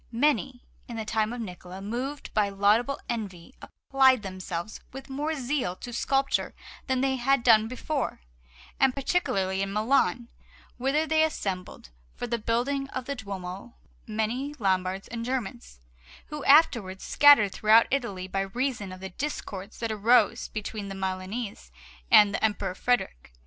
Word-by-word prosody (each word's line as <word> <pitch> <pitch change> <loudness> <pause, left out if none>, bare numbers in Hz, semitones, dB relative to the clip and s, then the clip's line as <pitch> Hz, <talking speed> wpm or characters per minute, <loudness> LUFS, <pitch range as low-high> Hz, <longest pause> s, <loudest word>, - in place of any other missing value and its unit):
Many, 260 0 0 0.2
in 235 - -7
the 220 - -4
time 220 0 0
of 245 - -5
Niccola, 180 -2 -8
moved 250 +8 -5
by 210 -2 +2
laudable 210 +7 +2
envy, 205 -3 -5
applied 265 -4 +2
themselves 185 0 -5
with 270 +1 -10
more 300 +4 -2
zeal 255 -8 -2
to 240 +5 -9
sculpture 270 +3 0 0.3
than 260 -2 +1
they 265 -1 +1
had 265 0 +2
done 220 -2 +5
before, 255 - -3 0.6
and 265 -1 +3
particularly 195 - 0
in 195 0 -2
Milan, 230 +1 +1 0.5
whither 275 +5 +1
there 315 0 +3
assembled 185 - -5 0.2
for - - -4
the 235 -1 -2
building 255 +5 -1
of 255 -2 -5
the 280 - -3
Duomo 200 -2 -7 0.3
many 230 +7 -2
Lombards 190 -2 0
and 230 0 -5
Germans, 240 - -4 0.5
who 300 -2 -6
afterwards 235 - +4
scattered 285 -9 +6
throughout 220 +4 +5
Italy 205 -9 -2
by 195 +1 -1
reason 230 0 -2
of 185 0 -10
the 190 - -5
discords 200 -4 -6
that 230 -1 -3
arose 220 +1 +3
between 210 -1 -5
the 195 - -6
Milanese 190 - -4 0.4
and 205 -1 +7
the - - -2
Emperor 205 -3 0
Frederick. 185 - -1
230 Hz, 150 wpm, -27 LUFS, 195-265 Hz, 0.6 s, and